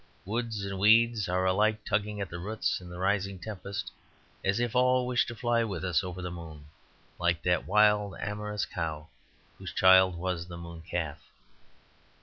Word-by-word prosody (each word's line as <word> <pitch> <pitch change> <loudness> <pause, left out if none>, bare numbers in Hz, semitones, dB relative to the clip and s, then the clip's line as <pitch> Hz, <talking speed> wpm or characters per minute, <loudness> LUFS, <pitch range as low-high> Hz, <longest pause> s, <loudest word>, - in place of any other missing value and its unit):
Woods 110 -1 -3
and 95 -1 -4
weeds 110 0 +4
are 90 +1 +1
alike 105 +3 +2
tugging 105 0 -1
at 100 - -3
the 90 - -5
roots 105 +1 -2
in 90 - -11
the 90 - -8
rising 100 +1 0
tempest, 100 +1 -6 0.5
as 100 +3 +1
if 120 0 -1
all 125 0 +4
wished 125 -1 +1
to 120 - -6
fly 120 0 +1
with 95 -5 -4
us 90 -1 +1
over 90 0 -6
the 90 - -4
moon, 80 -4 -9 0.5
like 85 -2 +1
that 90 -1 +1
wild 105 -2 +3
amorous 105 -1 -3
cow 80 -3 -4 0.5
whose - - -6
child 95 -1 +6
was 85 -1 -3
the 85 -1 -8
Moon 85 -1 -9
Calf. 80 -3 -3
95 Hz, 170 wpm, -29 LUFS, 90-105 Hz, 0.5 s, child